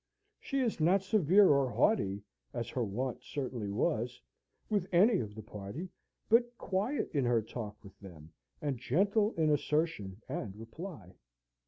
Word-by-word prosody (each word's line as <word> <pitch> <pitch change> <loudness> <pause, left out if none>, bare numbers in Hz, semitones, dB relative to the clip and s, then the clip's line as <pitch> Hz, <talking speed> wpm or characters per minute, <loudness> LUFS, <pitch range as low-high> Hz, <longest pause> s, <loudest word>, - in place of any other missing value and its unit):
She 275 -1 -1
is 235 -8 0
not 180 +5 +4
severe 195 -1 +5
or 140 -2 +3
haughty 100 - +1 0.3
(as 120 -1 -3
her 125 - -1
wont 115 +4 -3
certainly 125 -7 -4
was) 120 +2 -1 0.5
with 200 -4 -1
any 195 +4 +5
of 105 -2 -5
the 110 - -8
party, 105 - -7 0.4
but 240 +1 +3
quiet 205 +10 -1
in 140 -3 +2
her 120 -2 +2
talk 105 -2 -6
with 100 -1 -14
them, 85 -6 -12 0.3
and 140 -5 -1
gentle 200 - +2
in 155 -2 +2
assertion 150 - 0
and 125 - -4
reply. 115 - -9
140 Hz, 150 wpm, -32 LUFS, -, 0.5 s, severe